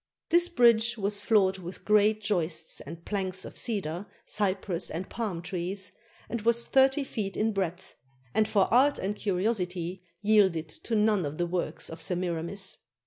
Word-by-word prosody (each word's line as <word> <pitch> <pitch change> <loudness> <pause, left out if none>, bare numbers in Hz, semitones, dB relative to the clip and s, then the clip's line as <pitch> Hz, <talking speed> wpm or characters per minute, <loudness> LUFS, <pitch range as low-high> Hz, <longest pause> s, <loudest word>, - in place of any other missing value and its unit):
This 345 +1 +5
bridge 235 -4 +4
was 205 0 -1
floored 195 -4 +3
with 180 0 -8
great 210 0 +4
joists 170 -6 -1
and 165 +4 -10
planks 190 -2 -2
of - - -9
cedar, 195 -5 -2 0.2
cypress, 190 -3 -1
and 175 +4 -4
palm 200 -8 -4
trees, 185 +2 -2 0.4
and 235 - -3
was 235 +2 +3
thirty 270 +2 +4
feet 210 -7 -4
in 220 +1 +2
breadth, 185 -4 -3 0.4
and 215 -1 +3
for 200 -3 +3
art 275 +4 +5
and 200 +2 -2
curiosity 185 -3 -1 0.2
yielded 190 -7 +3
to 225 +8 -4
none 210 -3 +3
of 145 0 -4
the 175 - +1
works 175 +1 -2
of 160 - -8
S 165 - -4
emir 175 -2 -1
amis. 190 +4 -3
195 Hz, 165 wpm, -28 LUFS, 175-220 Hz, 0.4 s, This